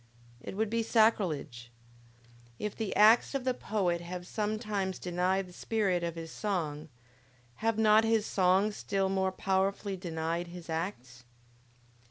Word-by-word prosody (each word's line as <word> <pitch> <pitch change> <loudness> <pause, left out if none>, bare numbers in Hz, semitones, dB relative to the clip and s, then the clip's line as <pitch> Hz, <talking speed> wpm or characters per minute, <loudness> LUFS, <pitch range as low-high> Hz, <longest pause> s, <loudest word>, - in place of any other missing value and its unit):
It 190 - -7
would 220 0 0
be 230 0 +1
sacrilege! 175 - +1 0.9
If 210 -1 -4
the 220 -3 -3
acts 220 +6 +5
of 270 - -1
the 255 0 +1
poet 185 -8 -1
have 175 +1 -6
sometimes 210 -2 -2
denied 180 +2 0
the 180 - -14
spirit 195 -4 0
of 170 -1 -3
his 165 -1 -7
song, 160 -7 -3 0.7
have 225 0 0
not 220 0 +5
his 225 -1 +2
songs 195 +2 +2
still 195 -1 -1
more 190 0 +1
powerfully 195 +1 -1
denied 170 -1 -3
his 170 -1 -9
acts? 130 -8 -5
190 Hz, 140 wpm, -31 LUFS, 170-215 Hz, 0.9 s, acts